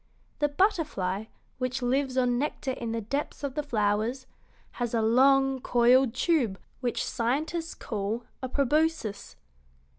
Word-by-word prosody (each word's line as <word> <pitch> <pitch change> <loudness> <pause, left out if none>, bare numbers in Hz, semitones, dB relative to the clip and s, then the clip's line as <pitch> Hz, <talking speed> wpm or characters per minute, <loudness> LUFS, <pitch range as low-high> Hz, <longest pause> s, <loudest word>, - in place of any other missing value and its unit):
The 295 - +3
butterfly, 285 - 0 0.3
which 255 0 -2
lives 265 +1 0
on 245 -1 +2
nectar 285 -1 -2
in 235 -3 -4
the 230 0 -2
depths 280 +7 -4
of 280 -2 -2
the 300 - -1
flowers, 225 0 0 0.6
has 240 -1 0
a 225 - +2
long, 270 +3 +4
coiled 245 0 +4
tube 260 - +1 0.2
which 245 -2 -1
scientists 305 +8 -2
call 215 +2 -3 0.2
a 260 - -3
proboscis. 285 -4 0
255 Hz, 130 wpm, -28 LUFS, 230-285 Hz, 0.6 s, long